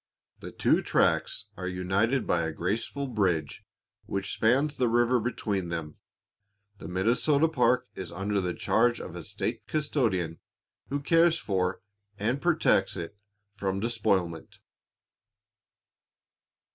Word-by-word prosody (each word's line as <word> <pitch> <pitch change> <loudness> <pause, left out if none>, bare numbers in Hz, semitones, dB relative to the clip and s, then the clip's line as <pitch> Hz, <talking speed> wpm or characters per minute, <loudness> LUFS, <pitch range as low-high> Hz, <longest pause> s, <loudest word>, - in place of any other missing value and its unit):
The - - -8
two - - +2
tracts - - +1
are 90 0 -5
united 95 +8 0
by 85 - +1
a 80 -1 -1
graceful 110 - -2
bridge 95 - -1 0.4
which 100 0 -2
spans 135 +6 +2
the 125 -2 +1
river 120 +2 +3
between 105 -6 -2
them. 80 -3 -5 0.8
The 80 - -8
Minnesota 120 - +2
park 125 -4 +2
is 95 - -6
under 100 +3 -1
the 90 -1 -2
charge 120 -1 +2
of 90 - -8
a 85 - -5
state - - -4
custodian, 110 - 0 0.5
who 140 +2 -2
cares 165 +2 +4
for 95 - -1 0.3
and 115 +7 -1
protects 165 - +2
it 85 +4 -6 0.4
from 95 -1 -2
despoilment. 95 -7 -1
105 Hz, 120 wpm, -28 LUFS, 90-125 Hz, 0.8 s, cares